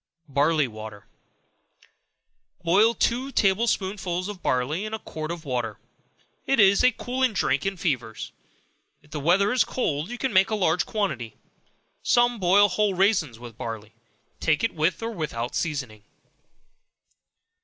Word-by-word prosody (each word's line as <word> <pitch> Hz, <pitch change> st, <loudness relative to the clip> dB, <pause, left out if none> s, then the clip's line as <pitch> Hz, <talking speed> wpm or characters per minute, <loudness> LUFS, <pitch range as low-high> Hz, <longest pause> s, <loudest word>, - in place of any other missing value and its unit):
Barley 145 Hz, +1 st, +2 dB
Water. 110 Hz, -3 st, -10 dB, 1.6 s
Boil 205 Hz, +7 st, +4 dB
two 255 Hz, +3 st, 0 dB
table 205 Hz, 0 st, +2 dB
spoonsful 190 Hz, -3 st, -2 dB
of 190 Hz, -3 st, -12 dB
barley 135 Hz, +9 st, 0 dB
in 215 Hz, +1 st, -3 dB
a -, -, -4 dB
quart 155 Hz, -7 st, -7 dB
of 170 Hz, -1 st, -6 dB
water; 120 Hz, -5 st, -2 dB, 0.7 s
it 270 Hz, -2 st, +2 dB
is 200 Hz, -1 st, +6 dB
a 250 Hz, -, +6 dB
cooling 250 Hz, +1 st, -1 dB
drink 140 Hz, -3 st, 0 dB
in 195 Hz, -1 st, -2 dB
fevers. 125 Hz, -10 st, -3 dB, 0.7 s
If 150 Hz, -, -23 dB
the 150 Hz, -, -4 dB
weather 185 Hz, +7 st, +3 dB
is 250 Hz, -, +4 dB
cold, 155 Hz, -, -2 dB
you 245 Hz, -, -5 dB
can 260 Hz, -2 st, -2 dB
make 190 Hz, 0 st, +5 dB
a 220 Hz, -, 0 dB
larger 180 Hz, -4 st, +1 dB
quantity. 140 Hz, -, -3 dB, 0.7 s
Some 240 Hz, -1 st, +3 dB
boil 195 Hz, +3 st, +5 dB
whole 205 Hz, +1 st, 0 dB
raisins 185 Hz, -, +2 dB
with 120 Hz, -2 st, -12 dB
barley; 110 Hz, -1 st, -6 dB, 0.5 s
take 155 Hz, -2 st, +1 dB
it 230 Hz, -, +1 dB
with 165 Hz, +7 st, 0 dB
or 230 Hz, -, -2 dB
without 135 Hz, -, -4 dB
seasoning. 130 Hz, -10 st, -3 dB
175 Hz, 145 wpm, -25 LUFS, 140-210 Hz, 1.6 s, is